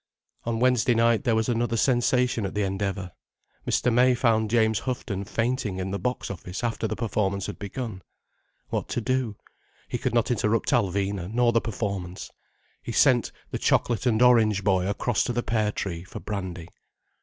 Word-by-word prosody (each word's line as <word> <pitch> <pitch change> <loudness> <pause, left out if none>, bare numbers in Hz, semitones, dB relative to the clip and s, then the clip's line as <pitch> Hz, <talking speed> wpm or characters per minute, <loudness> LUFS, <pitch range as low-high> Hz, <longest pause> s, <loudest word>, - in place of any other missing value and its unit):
On 115 -1 -1
Wednesday 125 -1 +3
night 115 +3 +3
there 115 -3 +3
was 110 0 +1
another 115 -1 0
sensation 125 -1 +2
at 95 - -4
the 105 - +1
Endeavour. 95 -1 -2 0.6
Mr. 125 - +2
May 125 +1 +5
found 110 -3 +2
James 110 -1 +3
Houghton 105 -6 -3
fainting 115 -2 -1
in 95 0 -3
the 100 - -2
box 125 -4 -2
office 90 +3 -6
after 115 -1 -1
the - - -3
performance 100 -4 -1
had - - -6
begun. 105 -1 -5 0.7
What - - -2
to - - -1
do? 125 -2 -1 0.5
He - - -3
could - - -1
not 120 +1 +2
interrupt 110 -1 +1
Alvina, 100 -1 0
nor 120 +1 +3
the 115 0 +2
performance. 100 -5 -4 0.5
He - - -6
sent - - +3 0.2
the - - -3
chocolate 120 +1 +1
and 115 0 +3
orange 110 -5 +4
boy 95 -2 +2
across 105 +2 0
to 120 - -1
the 120 0 -1
Pear 110 -2 0
Tree 85 -5 -4
for 95 - -9
brandy. 95 -4 -5
110 Hz, 175 wpm, -26 LUFS, 100-120 Hz, 0.7 s, May